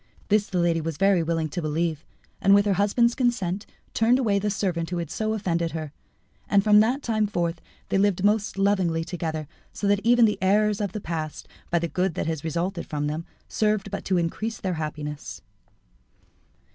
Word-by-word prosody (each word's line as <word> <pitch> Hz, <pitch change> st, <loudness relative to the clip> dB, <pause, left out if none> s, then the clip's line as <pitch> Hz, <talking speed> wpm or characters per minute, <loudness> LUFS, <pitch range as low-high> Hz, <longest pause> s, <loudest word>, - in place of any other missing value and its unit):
This 210 Hz, 0 st, +3 dB
the 185 Hz, -, -3 dB
lady 170 Hz, -1 st, +2 dB
was 160 Hz, -1 st, -4 dB
very 195 Hz, 0 st, +4 dB
willing 165 Hz, -1 st, -1 dB
to 175 Hz, -, -4 dB
believe, 155 Hz, 0 st, -1 dB, 0.4 s
and 195 Hz, +1 st, +6 dB
with 200 Hz, 0 st, +4 dB
her 205 Hz, -, +2 dB
husband's 210 Hz, +5 st, +2 dB
consent 210 Hz, -7 st, -1 dB, 0.3 s
turned 230 Hz, +3 st, +4 dB
away 210 Hz, -6 st, +2 dB
the 210 Hz, +1 st, -1 dB
servant 180 Hz, -5 st, -1 dB
who 175 Hz, -, -2 dB
had 170 Hz, -3 st, -4 dB
so 220 Hz, 0 st, -1 dB
offended 170 Hz, -6 st, -1 dB
her. 155 Hz, -3 st, -4 dB, 0.6 s
And 200 Hz, -1 st, +4 dB
from 210 Hz, 0 st, +6 dB
that 250 Hz, +6 st, +2 dB
time 215 Hz, -2 st, +1 dB
forth 170 Hz, -4 st, -2 dB, 0.3 s
they 195 Hz, -, +2 dB
lived 195 Hz, -2 st, +2 dB
most 210 Hz, 0 st, +1 dB
lovingly 190 Hz, -5 st, +2 dB
together, 160 Hz, -3 st, -4 dB, 0.3 s
so -, -, -4 dB
that 205 Hz, 0 st, +3 dB
even 240 Hz, 0 st, +5 dB
the 210 Hz, -, 0 dB
errors 210 Hz, +2 st, +2 dB
of 200 Hz, -3 st, -2 dB
the 215 Hz, -, -4 dB
past, 160 Hz, -3 st, -5 dB, 0.2 s
by 170 Hz, -, +2 dB
the 170 Hz, 0 st, 0 dB
good 180 Hz, +1 st, -1 dB
that -, -, -2 dB
had 160 Hz, -2 st, -3 dB
resulted 170 Hz, +3 st, -2 dB
from 145 Hz, -1 st, -2 dB
them, 155 Hz, +3 st, -3 dB, 0.2 s
served 210 Hz, -2 st, 0 dB
but 200 Hz, -, -4 dB
to 185 Hz, -, +1 dB
increase 205 Hz, +6 st, -2 dB
their 185 Hz, -2 st, -2 dB
happiness. 150 Hz, -1 st, -6 dB
190 Hz, 195 wpm, -25 LUFS, 165-210 Hz, 0.6 s, and